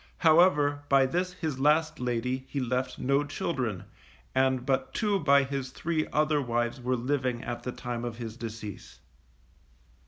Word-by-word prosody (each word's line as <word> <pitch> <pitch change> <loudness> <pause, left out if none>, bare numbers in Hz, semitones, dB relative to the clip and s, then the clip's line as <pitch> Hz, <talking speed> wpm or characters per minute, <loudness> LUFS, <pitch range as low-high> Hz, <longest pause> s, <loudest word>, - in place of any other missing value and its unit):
However, 155 -3 +4
by 135 -1 +5
this 180 +6 -1
his 160 -7 -4
last 155 +2 +2
lady, 125 +1 -2
he 140 - -2
left 125 0 -1
no 140 +2 +2
children, 130 - -3 0.5
and 130 -1 +2
but 135 -1 -1
two 205 -3 +1
by 140 -3 +5
his 135 -1 -3
three 155 +4 -2
other 150 -1 +2
wives 120 0 -1
were 125 +1 0
living 125 -1 -1
at 120 0 -4
the 125 - -4
time 120 -1 -5
of 120 -2 -4
his 115 -2 -6
decease. 110 - -8
130 Hz, 155 wpm, -28 LUFS, 120-150 Hz, 0.5 s, by